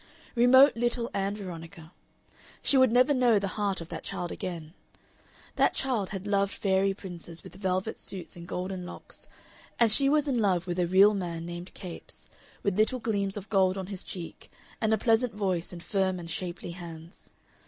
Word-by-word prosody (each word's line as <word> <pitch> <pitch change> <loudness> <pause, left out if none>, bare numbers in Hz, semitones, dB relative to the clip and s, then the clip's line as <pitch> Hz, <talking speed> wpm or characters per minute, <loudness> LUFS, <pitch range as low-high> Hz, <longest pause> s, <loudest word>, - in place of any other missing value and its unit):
Remote 260 +2 +7
little 240 0 -1
Ann 195 +1 -1
Veronica! 165 -4 -9 0.7
She - - +4
would 260 -3 +6
never 250 +4 +5
know 245 -4 +4
the 200 -1 -1
heart 200 -4 -1
of 165 - -9
that - - -5
child 175 -1 -4
again! 165 -3 -5 0.8
That - - +3
child 240 -8 0
had 195 -1 -5
loved 200 -1 +1
fairy 195 0 +2
princes 175 -4 -7
with - - -12
velvet 190 +2 -2
suits 190 -3 -6
and 170 0 -10
golden 185 0 -4
locks, 180 - -11 0.5
and 230 -2 +5
she 275 +5 +5
was 300 0 +2
in 255 -4 +1
love 185 -5 +2
with 175 0 -3
a 175 - +2
real 195 +4 +6
man 170 -4 -4
named 175 +1 -7
Capes, 180 -3 -9 0.4
with 200 0 0
little 220 +4 +3
gleams 200 -3 -1
of 205 0 -7
gold 190 -2 +3
on 190 - -3
his 195 -1 -6
cheek 175 -3 -8 0.3
and 220 -1 +2
a 220 - +4
pleasant 225 +1 +2
voice 185 -5 -1
and 175 -1 -9
firm 190 -2 0
and 170 -1 -7
shapely 175 +1 -4
hands. 170 0 -11
195 Hz, 185 wpm, -28 LUFS, 175-220 Hz, 0.8 s, Remote